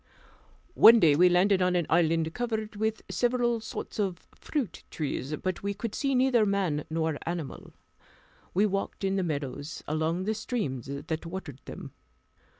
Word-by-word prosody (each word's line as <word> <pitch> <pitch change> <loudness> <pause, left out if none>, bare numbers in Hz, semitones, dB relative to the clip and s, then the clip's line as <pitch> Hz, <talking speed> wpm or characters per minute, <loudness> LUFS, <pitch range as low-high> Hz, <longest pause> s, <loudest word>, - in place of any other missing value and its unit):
One 230 +1 +9
day 155 -7 +5
we 180 +4 +6
landed 185 +2 +3
on 180 0 +2
an 175 -2 +1
island 165 -1 +2
covered 220 -3 -3
with 220 +1 -1
several 240 -1 +1
sorts 220 0 -7
of 190 -4 -2
fruit 270 - -4
trees, 145 -1 -3
but 185 +2 -3
we 200 0 -2
could 215 +1 -4
see 275 -1 0
neither 250 -3 +4
man 190 -7 0
nor 160 -2 -1
animal. 170 -4 -5 0.8
We 200 +3 +4
walked 195 0 -2
in 195 0 +1
the 195 - +1
meadows, 145 -3 -4
along 160 +4 0
the 215 +3 0
streams 200 - -3
that 155 +4 -4
watered 165 -7 -7
them. - - -8
185 Hz, 155 wpm, -28 LUFS, 160-215 Hz, 0.8 s, One